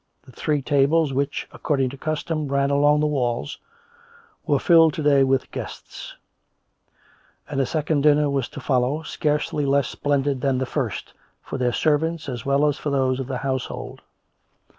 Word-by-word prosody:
The -, -, -16 dB
three 145 Hz, +2 st, -1 dB
tables, 145 Hz, +2 st, +2 dB
which, 140 Hz, +2 st, -2 dB
according 135 Hz, -4 st, -1 dB
to -, -, -8 dB
custom, 155 Hz, +1 st, -2 dB
ran 140 Hz, 0 st, +1 dB
along 145 Hz, +1 st, +4 dB
the -, -, +2 dB
walls, 130 Hz, -2 st, -1 dB, 0.9 s
were 145 Hz, -, +3 dB
filled 165 Hz, +1 st, +5 dB
to 155 Hz, -, -3 dB
day 140 Hz, -2 st, +5 dB
with 135 Hz, 0 st, 0 dB
guests; -, -, -8 dB, 1.3 s
and 140 Hz, -2 st, -1 dB
a 130 Hz, -, 0 dB
second 155 Hz, -2 st, 0 dB
dinner 150 Hz, 0 st, +4 dB
was 140 Hz, -3 st, -1 dB
to -, -, -9 dB
follow, 130 Hz, +3 st, 0 dB
scarcely 150 Hz, -1 st, -1 dB
less 140 Hz, -1 st, +2 dB
splendid 140 Hz, -2 st, -1 dB
than 135 Hz, -1 st, +1 dB
the 130 Hz, -, -1 dB
first, -, -, -4 dB, 0.3 s
for 135 Hz, -, -6 dB
their 125 Hz, -1 st, +1 dB
servants 155 Hz, +3 st, 0 dB
as 125 Hz, -3 st, -5 dB
well 140 Hz, +2 st, +3 dB
as 145 Hz, -1 st, 0 dB
for 150 Hz, -, -3 dB
those 130 Hz, -2 st, +1 dB
of 130 Hz, -, -4 dB
the 130 Hz, -2 st, -3 dB
hoiisehold. 130 Hz, 0 st, -4 dB
140 Hz, 165 wpm, -23 LUFS, 135-150 Hz, 1.3 s, filled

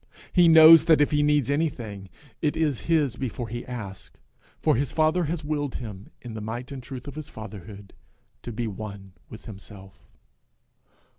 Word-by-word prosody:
He 175 Hz, -2 st, +6 dB
knows 160 Hz, 0 st, +9 dB
that 160 Hz, -3 st, +5 dB
if 145 Hz, -, +3 dB
he 145 Hz, -1 st, +2 dB
needs 145 Hz, -3 st, +2 dB
anything, 115 Hz, -, -3 dB, 0.3 s
it 150 Hz, -1 st, 0 dB
is 150 Hz, -6 st, 0 dB
his 150 Hz, -7 st, +2 dB
before 120 Hz, -2 st, -4 dB
he 120 Hz, +1 st, -5 dB
asks 100 Hz, -6 st, -7 dB
it; -, -, -30 dB, 0.4 s
for -, -, +2 dB
his 135 Hz, +1 st, -1 dB
father 160 Hz, +2 st, +2 dB
has 155 Hz, 0 st, -4 dB
willed 145 Hz, -3 st, -2 dB
him, 105 Hz, -4 st, -8 dB
in 120 Hz, -2 st, -8 dB
the 110 Hz, -, -6 dB
might 120 Hz, +5 st, -6 dB
and 135 Hz, -2 st, -6 dB
truth 125 Hz, +1 st, -9 dB
of 140 Hz, -, -6 dB
his 155 Hz, -1 st, -8 dB
fatherhood, 105 Hz, -2 st, -10 dB, 0.5 s
to 120 Hz, -, -7 dB
be 115 Hz, +1 st, -3 dB
one 100 Hz, -2 st, -7 dB, 0.2 s
with 110 Hz, -, -12 dB
himself. 95 Hz, -2 st, -13 dB
125 Hz, 175 wpm, -25 LUFS, 105-150 Hz, 0.5 s, knows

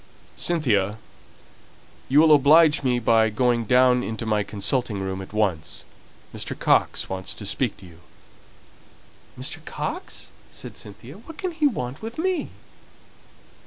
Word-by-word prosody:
"Cynthia, 110 Hz, -, +1 dB, 1.1 s
you 145 Hz, +3 st, +6 dB
will 160 Hz, -1 st, +6 dB
oblige 150 Hz, +2 st, +6 dB
me 125 Hz, -3 st, +1 dB
by 115 Hz, -1 st, +3 dB
going 120 Hz, +1 st, +1 dB
down 125 Hz, +2 st, +4 dB
into 115 Hz, -1 st, -4 dB
my 105 Hz, -1 st, +1 dB
consulting 105 Hz, +2 st, -2 dB
room 95 Hz, 0 st, -3 dB
at 95 Hz, -, -10 dB
once. 95 Hz, -7 st, -1 dB, 0.5 s
Mr. -, -, -5 dB
Coxe -, -, +2 dB
wants 95 Hz, 0 st, -5 dB
to 105 Hz, -, -8 dB
speak 120 Hz, +3 st, -1 dB
to 100 Hz, -, -14 dB
you!" 85 Hz, -2 st, -15 dB, 1.4 s
"Mr. -, -, -5 dB
Coxe?" -, -, -5 dB, 0.2 s
said -, -, -10 dB
Cynthia. 120 Hz, -, -11 dB
"What 310 Hz, +7 st, -12 dB
can 370 Hz, -, -3 dB
he 315 Hz, -3 st, +2 dB
want 130 Hz, -, -4 dB
with 225 Hz, +1 st, -7 dB
me?" 360 Hz, -1 st, -1 dB
120 Hz, 135 wpm, -24 LUFS, 105-150 Hz, 1.4 s, you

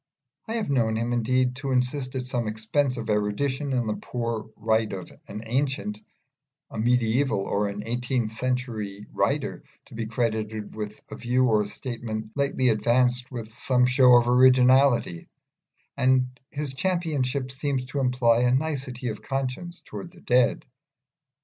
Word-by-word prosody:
I 225 Hz, -, -3 dB
have 220 Hz, -10 st, -1 dB
known 115 Hz, -5 st, +2 dB
him, 115 Hz, +2 st, -1 dB
indeed, 125 Hz, +2 st, +1 dB
insist 130 Hz, 0 st, -1 dB
at 130 Hz, -1 st, -2 dB
some 125 Hz, -3 st, -2 dB
expense 125 Hz, +5 st, 0 dB
of 115 Hz, -1 st, -5 dB
erudition 130 Hz, +7 st, 0 dB
on 120 Hz, -2 st, +1 dB
the 105 Hz, -1 st, -2 dB
prior 115 Hz, -3 st, -3 dB
right 110 Hz, 0 st, +1 dB
of 95 Hz, -2 st, -6 dB, 0.2 s
an 105 Hz, -, -7 dB
ancient, 140 Hz, -, -1 dB, 0.7 s
a -, -, -5 dB
medieval, 120 Hz, 0 st, +2 dB
or 100 Hz, +1 st, 0 dB
an 100 Hz, +1 st, -5 dB
eighteenth 120 Hz, -1 st, -1 dB
century 110 Hz, -4 st, -3 dB
writer -, -, -1 dB, 0.2 s
to -, -, -16 dB
be 115 Hz, -1 st, -4 dB
credited 110 Hz, -2 st, -2 dB
with 105 Hz, 0 st, -6 dB
a -, -, -5 dB
view 125 Hz, +2 st, +2 dB
or 105 Hz, -4 st, +2 dB
statement 110 Hz, -2 st, -5 dB
lately 140 Hz, -3 st, +1 dB
advanced 125 Hz, +3 st, +2 dB
with 115 Hz, -3 st, -7 dB
some 125 Hz, +1 st, +2 dB
show 125 Hz, 0 st, +6 dB
of 120 Hz, 0 st, +5 dB
originality; 125 Hz, -5 st, +4 dB, 0.7 s
and 130 Hz, -1 st, +2 dB
this 145 Hz, -2 st, -3 dB
championship 140 Hz, -5 st, -1 dB
seems 135 Hz, -1 st, -2 dB
to 140 Hz, +2 st, -4 dB
imply 125 Hz, -3 st, +3 dB
a 125 Hz, 0 st, +3 dB
nicety 130 Hz, -3 st, -1 dB
of 110 Hz, -, -6 dB
conscience 140 Hz, +6 st, -4 dB
towards 175 Hz, -, -8 dB
the -, -, -16 dB
dead. 125 Hz, 0 st, +2 dB
125 Hz, 150 wpm, -26 LUFS, 110-130 Hz, 0.7 s, show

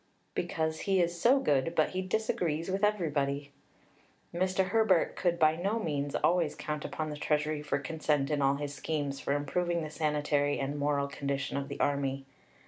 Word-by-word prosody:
"Because 160 Hz, 0 st, -1 dB
he 190 Hz, -1 st, +4 dB
is 170 Hz, -1 st, 0 dB
so 260 Hz, +4 st, +5 dB
good, 145 Hz, -, +1 dB
but 155 Hz, -, +3 dB
he 185 Hz, -, -2 dB
disagrees 185 Hz, -4 st, -1 dB
with 195 Hz, +2 st, -1 dB
everybody." 145 Hz, -8 st, 0 dB, 0.8 s
Mr. 185 Hz, +1 st, +1 dB
Herbert 200 Hz, -4 st, +3 dB
could 175 Hz, -2 st, +1 dB
by 155 Hz, -1 st, +4 dB
no 195 Hz, +7 st, -1 dB
means 145 Hz, -8 st, -2 dB
always 170 Hz, -3 st, +2 dB
count 150 Hz, 0 st, -4 dB
upon 155 Hz, -1 st, -3 dB
the 150 Hz, -, -5 dB
Treasury 150 Hz, 0 st, 0 dB
for 150 Hz, -, -1 dB
consent 150 Hz, 0 st, -1 dB
in 145 Hz, -1 st, +1 dB
all 135 Hz, 0 st, +3 dB
his 145 Hz, 0 st, -4 dB
schemes 145 Hz, -1 st, -3 dB
for 140 Hz, -, -1 dB
improving 170 Hz, +4 st, 0 dB
the 155 Hz, -, -6 dB
sanitary 150 Hz, -2 st, +1 dB
and 140 Hz, +2 st, -2 dB
moral 140 Hz, -1 st, +1 dB
condition 140 Hz, -1 st, -3 dB
of 140 Hz, 0 st, -2 dB
the 140 Hz, -, -7 dB
Army. 135 Hz, -1 st, 0 dB
150 Hz, 175 wpm, -31 LUFS, 145-175 Hz, 0.8 s, so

